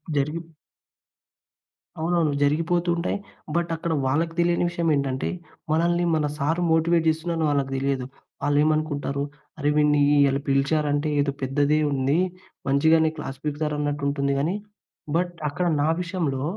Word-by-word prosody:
జరిగి 150 +4 0 1.6
అవునవును 165 -2 +1
జరిగిపోతూ 165 +4 +1
ఉంటాయి. 170 - -1 0.4
బట్ 170 0 0
అక్కడ 165 0 -2
వాళ్ళకి 165 +5 0
తెలియని 170 0 +2
విషయమేంటంటే, 145 -6 0 0.4
మనల్ని 170 +2 +2
మన 155 -1 +1
సార్ 160 +4 0
మోటివేట్ 165 0 +3
చేస్తున్నారని 160 0 -1
వాళ్ళకి 140 -2 0
తెలియదు. 135 -1 -1 0.4
వాళ్ళేమనుకుంటారు 145 -1 +1 0.4
"అరె 145 0 +1
వీడిని 150 -1 +4 0.3
అల 135 - 0
పిలిచారంటే 145 +2 +1
ఏదో 140 0 +2
పెద్దదే 145 +3 +2
ఉంది. 135 +3 +1 0.5
మంచిగానే 160 +3 +4
క్లాస్ 135 -3 -6
పికుతారు 150 0 -2
అన్నట్టు 145 -1 -2
ఉంటుంది." 140 -1 0
కానీ 165 +7 0 0.6
బట్ 175 +1 +1 0.2
అక్కడ 180 +5 -2 0.2
నా 150 - +2
విషయంలో 165 -7 -2
150 Hz, 125 wpm, -24 LUFS, 140-165 Hz, 1.6 s, వీడిని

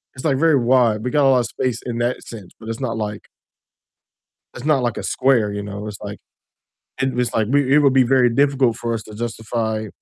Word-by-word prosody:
It's 130 - -9
like 140 -4 +2
very 160 0 +4
wide, 120 -3 +2
we - - 0
got 145 0 +3
a - - +5
lot 130 -1 +4
of 120 - -1
space 125 0 -3
in 120 -1 -3
that 120 +1 -1
sense, 105 -6 -10
but 110 - -11
it's 115 - -4
not 115 -4 -2
like 105 -1 -4 1.3
It's 120 - -8
not 150 -4 +2
like 120 -2 -1
a - - -4
square, 120 -6 +2
you 100 0 -4
know? 100 +1 -6
It's 105 -2 -7
like - - -7 0.8
and 130 -2 -1
it's 125 0 -1
like 110 -2 +1
we 140 -1 +2
it - - +7
would 140 -3 +4
be 135 -1 +5
very 125 0 +3
difficult 135 -3 +2
for 115 0 -3
us 110 -2 -4
to 110 - -12
justify 110 -1 -3
120 Hz, 235 wpm, -20 LUFS, 110-130 Hz, 1.3 s, it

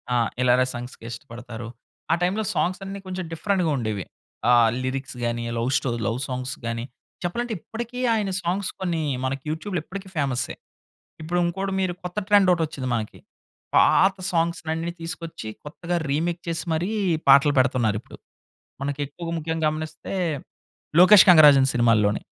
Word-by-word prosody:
ఆ! - - +4 0.2
ఇలాగ 125 0 +4
సాంగ్స్‌కి 120 -1 -8
ఇష్టపడతారు. 120 -1 -8 0.4
ఆ - - +5
టైమ్‌లో 190 +5 +1
సాంగ్స్ 185 +2 0
అన్ని 195 +1 -6
కొంచెం 185 0 -4
డిఫరెంట్‌గా 180 +1 0
ఉండేవి. 110 -6 -3 0.4
ఆ - - +6 0.3
లిరిక్స్ 135 +1 -4
గాని 120 0 -1
లవ్ 115 +2 0
స్టో 130 - -2 0.2
లవ్ 115 +2 -1
సాంగ్స్ 130 -1 -4
గాని 115 0 -2 0.4
చెప్పాలంటే 235 +7 -2
ఇప్పటికీ 235 +6 -6
ఆయన 210 -3 0
సాంగ్స్ 185 +3 -1
కొన్ని 175 -4 -1 0.2
మనకి 135 0 -3
యూట్యూబ్‌లో 175 +4 -3
ఇప్పటికి 190 +2 -8
ఫేమస్సే. 130 -5 -1 0.7
ఇప్పుడింకోటి 175 +4 -1
మీరు 185 -2 0
కొత్త 180 +3 -5
ట్రెండ్ 205 -2 +5
ఒకటొచ్చింది 155 -6 -2
మనకి. 110 -2 -4 0.6
పాత 195 +1 +5 0.2
సాంగ్స్ 170 0 +1
అన్ని 165 +2 -3
తీసుకొచ్చి 165 -7 -6 0.2
కొత్తగా 170 +4 -4
రీమేక్ 165 +4 0
చేసి 165 -1 -2
మరి 165 +4 0 0.4
పాటలు 140 +2 +7
పెడుతున్నారిప్పుడు. 120 -5 0 0.7
మనకి 140 +1 -3
ఎక్కువగా 165 +4 -7
ముఖ్యంగా 160 0 -1
గమనిస్తే 155 +3 -5 0.9
లోకేష్ 185 +3 +9
కంగరాజన్ 145 -6 +8
సినిమాల్లోనే. 115 -4 +3
160 Hz, 135 wpm, -24 LUFS, 130-180 Hz, 0.9 s, లోకేష్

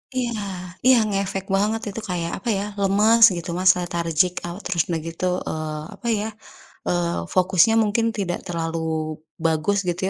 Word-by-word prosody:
Iya, 245 -2 0 0.6
iya 260 - +8
ngefek 195 -1 -2
banget 215 +3 +1
itu 210 - -6
kayak 170 -2 -2
apa 230 - -4
ya, 195 - -2 0.2
lemes 210 +4 +4
gitu 170 +1 -6
Mas, 185 0 +6
lethargic 170 0 0
out. 175 +4 -6
Terus 175 -3 +1
udah 165 -2 -1
gitu, 165 +2 -4 0.2
eee, 155 -1 -3
apa 235 - -8
ya, 215 - -2 0.6
eee, 175 -1 0 0.2
fokusnya 185 +3 +4
mungkin 225 +2 +1
tidak 175 -3 -1
terlalu 165 -1 -2 0.6
bagus 160 +4 +1
gitu 175 0 -1
185 Hz, 155 wpm, -23 LUFS, 170-205 Hz, 0.6 s, iya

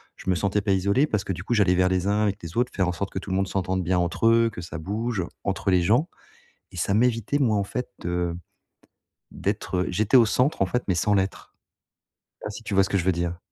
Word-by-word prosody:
je - - -7
me 95 - +3
sentais 100 +3 0
pas 100 -1 0
isolé 100 +9 +2
parce 105 -6 -1
que, 95 - -3
du 90 0 -7
coup, 120 - -1
j'allais 100 -4 +4
vers 90 0 +3
les 95 -1 0
uns, 105 +1 +2
avec 100 -1 0
les 85 +1 -8
autres, 125 +1 +1
faire 95 -2 +1
en - - +1
sorte 95 +3 -4
que - - -6
tout 95 - -9
le - - 0
monde 95 0 +1
s'entende 95 0 -1
bien 90 +1 +1
entre 85 +5 0
eux, 115 0 +4
que 105 - -8
ça 85 -2 -7
bouge 105 +4 -2 0.2
entre 100 0 -1
les 90 - +4
gens 120 - +3 0.7
et - - -11
ça 90 +3 0
m'évitait 115 +3 +1
moi, 120 -7 +2
en 100 - +1
fait, 125 +5 -4 0.2
heu, 85 -1 -1
de - - -6 1.0
d'être, 95 - -2
heu 90 - 0
j'étais 105 +7 +1
au 120 - +6
centre, 125 +6 +1
en - - +5
fait, 125 +6 -1
mais 95 - +1
sans 105 +5 +1
l'être. 95 -1 -2 0.9
Pas - - -4
si - - -8
tu - - -3
vois 95 - +5
ce - - -4
que 100 - +1
je 85 - -2
veux 95 - +3
dire? 85 0 -3
95 Hz, 265 wpm, -25 LUFS, 90-110 Hz, 1.0 s, au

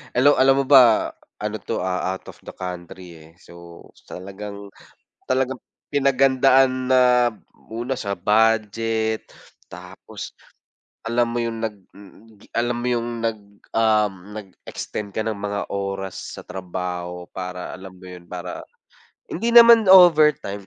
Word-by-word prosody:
Alaw 145 +4 +5
alam 135 +1 +4
mo - - -10
ba 125 -5 +6 0.3
ano 105 +1 -3
'to, 90 - -4
ah, 95 0 -2
out - - -14
of - - -23
the - - -9
country, 90 0 -8 0.2
eh, - - -20
so 85 -2 -14 0.3
talagang, 100 +1 -9 0.6
talagang 130 0 0 0.3
pinaghandaan 135 -1 +3
na, 125 -1 +4 0.4
una 120 +4 -4
sa 100 -2 -4
budget, 110 +2 0 0.4
tapos - - -10 0.7
alam 120 +1 0
mo 120 - -1
yung 115 -1 -4
nag 110 -2 -4 0.8
alam 120 +1 0
mo 120 - -4
yung 120 -1 -1 0.2
nag 115 -1 -1 0.4
um, 110 -2 +2 0.3
nag-extend 100 +1 -8
ka 110 - -2
ng 110 - -1
mga 100 0 -4
oras 95 -1 -5
sa - - -8
trabaho 90 -1 -6
para 90 -1 -6
alam 95 +1 -10
mo 95 - -14
yo'n, 90 -1 -12
para 90 -1 -7 0.7
hindi 230 +6 -2
naman 235 -2 +8
overtime 155 - +5
110 Hz, 130 wpm, -22 LUFS, 95-130 Hz, 0.8 s, naman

